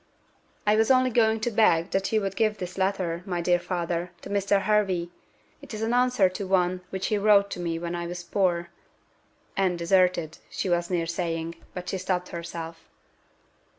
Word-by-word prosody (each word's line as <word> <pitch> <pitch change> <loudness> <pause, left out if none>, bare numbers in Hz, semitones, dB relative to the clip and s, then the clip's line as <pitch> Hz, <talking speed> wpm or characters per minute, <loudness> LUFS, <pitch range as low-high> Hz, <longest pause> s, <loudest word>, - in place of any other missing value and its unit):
"I 210 0 +4
was 220 0 +3
only 255 -1 +4
going 220 -1 +3
to 240 - 0
beg 195 -6 +3
that 195 0 0
you 220 -1 +2
would 195 -1 -3
give 215 -2 +1
this 180 -1 -6
letter, 190 -3 -1
my 180 -3 -3
dear 175 +1 +2
father, 175 -1 -2
to - - -8
Mr. 200 0 +2
Hervey. 190 -5 +1 0.5
It - - -8
is 215 - -4
an 225 +2 0
answer 250 -5 +4
to 185 +2 -5
one 180 -1 +1
which 190 0 -3
he 210 - +1
wrote 200 -1 +4
to - - -4
me 170 -1 -2
when 170 +1 -4
I 170 0 -3
was 175 0 -6
poor" 175 -2 0 0.9
and 185 -2 +1
deserted, 170 -2 +2
she 190 - -3
was 175 0 +1
near 175 -2 0
saying, 165 -1 -3 0.2
but 180 -1 -6
she 190 - -2
stopped 180 -1 -2
herself. 170 -1 -7
185 Hz, 185 wpm, -26 LUFS, 170-205 Hz, 0.9 s, I